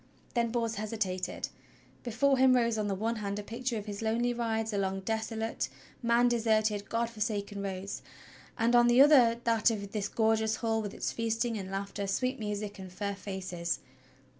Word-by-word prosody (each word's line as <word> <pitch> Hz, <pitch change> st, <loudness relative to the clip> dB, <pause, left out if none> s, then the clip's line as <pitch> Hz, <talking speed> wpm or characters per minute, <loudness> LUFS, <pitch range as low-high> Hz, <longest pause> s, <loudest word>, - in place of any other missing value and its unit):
Then 235 Hz, -1 st, +1 dB
Bors 230 Hz, -1 st, -1 dB
hesitated. 195 Hz, -4 st, -2 dB, 0.5 s
Before 255 Hz, +3 st, +2 dB
him 260 Hz, -1 st, +6 dB
rose 235 Hz, -2 st, +2 dB
on 210 Hz, -, 0 dB
the 195 Hz, -, 0 dB
one 225 Hz, +4 st, -1 dB
hand 200 Hz, -1 st, -3 dB
a 210 Hz, -, -4 dB
picture 235 Hz, +2 st, -3 dB
of 205 Hz, -, -5 dB
his 205 Hz, -1 st, -5 dB
lonely 235 Hz, +2 st, +1 dB
rides 225 Hz, -2 st, -1 dB
along 195 Hz, -1 st, -1 dB
desolate, 220 Hz, +2 st, -2 dB, 0.3 s
man 235 Hz, 0 st, +4 dB
deserted, 220 Hz, -3 st, +1 dB
God 230 Hz, +1 st, 0 dB
forsaken 210 Hz, -2 st, -3 dB
roads, 195 Hz, 0 st, -4 dB, 0.6 s
and 235 Hz, +1 st, +3 dB
on 240 Hz, 0 st, +6 dB
the 240 Hz, +1 st, +5 dB
other 255 Hz, -5 st, +7 dB
that 230 Hz, 0 st, +3 dB
of 200 Hz, -3 st, -4 dB
this 205 Hz, -2 st, -1 dB
gorgeous 220 Hz, -1 st, +2 dB
hall 225 Hz, -1 st, 0 dB
with 205 Hz, -2 st, -5 dB
its -, -, -2 dB
feasting 230 Hz, 0 st, -1 dB
and 190 Hz, -3 st, -5 dB
laughter, 195 Hz, +1 st, -3 dB
sweet 255 Hz, +7 st, 0 dB
music 210 Hz, -1 st, -4 dB
and 190 Hz, -1 st, -8 dB
fair 200 Hz, +2 st, -3 dB
faces. 185 Hz, -3 st, -3 dB
220 Hz, 175 wpm, -31 LUFS, 200-235 Hz, 0.6 s, other